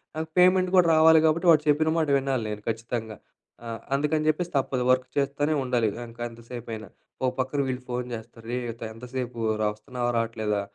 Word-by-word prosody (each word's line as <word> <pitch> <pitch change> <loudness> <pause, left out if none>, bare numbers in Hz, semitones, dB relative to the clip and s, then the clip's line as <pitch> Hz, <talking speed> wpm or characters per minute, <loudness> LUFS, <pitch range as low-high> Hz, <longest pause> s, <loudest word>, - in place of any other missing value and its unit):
నాకు 160 0 -3
పేమెంట్ 185 0 +5
కూడా 180 -2 +6
రావాలి 160 0 +7
కాబట్టి 165 +3 +2
వాడు 155 -2 +4
చెప్పిన 155 +2 +3
మాట 160 -2 +1
వినాలి 135 -3 -1
నేను 105 0 -5
ఖచ్చితంగా. 115 -1 -4 0.5
ఆ! - - -6 0.3
అందుకని 150 +2 0
చెప్పేసి 175 +2 -1
తప్పదు 130 -1 0
వర్క్ 130 0 +2
చేస్తూనే 145 +2 +1
ఉండాలి, 120 -4 +1 0.2
ఇంక 115 +1 -15
ఎంత 115 0 -14
సేపు 120 -1 -7
అయిన. 110 0 -8 0.4
ఓ - - +3
పక్కన 130 +3 -1
వీళ్ళు 130 -1 -3
ఫోను 125 0 -2
చేస్తారు, 115 0 -11
"రేయ్! 120 -2 -2
త - - -4
ఎంతసేపు, 125 +1 -6 0.2
రా 105 - +2
వస్తున్నావా 120 +2 -3
రావట్లేదా? 110 -3 -1
125 Hz, 185 wpm, -26 LUFS, 115-150 Hz, 0.5 s, రావాలి